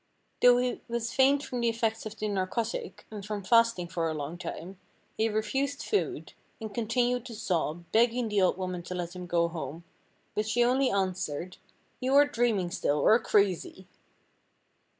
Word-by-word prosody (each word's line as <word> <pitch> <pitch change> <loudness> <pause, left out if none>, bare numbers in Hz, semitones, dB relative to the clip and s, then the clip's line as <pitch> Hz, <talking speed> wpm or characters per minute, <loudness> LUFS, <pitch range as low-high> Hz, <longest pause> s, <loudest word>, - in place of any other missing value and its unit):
Though 245 0 +7
he 250 0 -1
was 235 -1 -3
faint 275 +2 +4
from 250 -3 -4
the 235 - +3
effects 225 -1 -1
of 215 +1 -10
the 215 - -2
narcotic, 205 +3 -3
and 210 -2 -7
from 205 0 -4
fasting 230 -3 +3
for 165 -1 -1
a 155 - -3
long 150 +2 -4
time, 180 +2 -7 0.4
he 220 +1 +1
refused 270 +7 -1
food, 415 - -2 0.3
and 220 -2 -7
continued 240 +2 0
to 235 - -8
sob, 170 -3 -2
begging 235 +1 +3
the 210 -2 +1
old 185 -1 +3
woman 185 -2 -3
to 180 +1 -6
let 175 0 -4
him 180 -1 -7
go 170 -1 +2
home, 165 -1 -6 0.5
but 210 0 -1
she 240 +2 +2
only 260 +2 +3
answered, 185 -3 -2 0.4
"you 260 +2 +1
are 290 +1 +8
dreaming 230 -10 0
still, 145 - 0
or 215 +11 +5
crazy." 190 -3 0
215 Hz, 170 wpm, -29 LUFS, 180-240 Hz, 0.5 s, are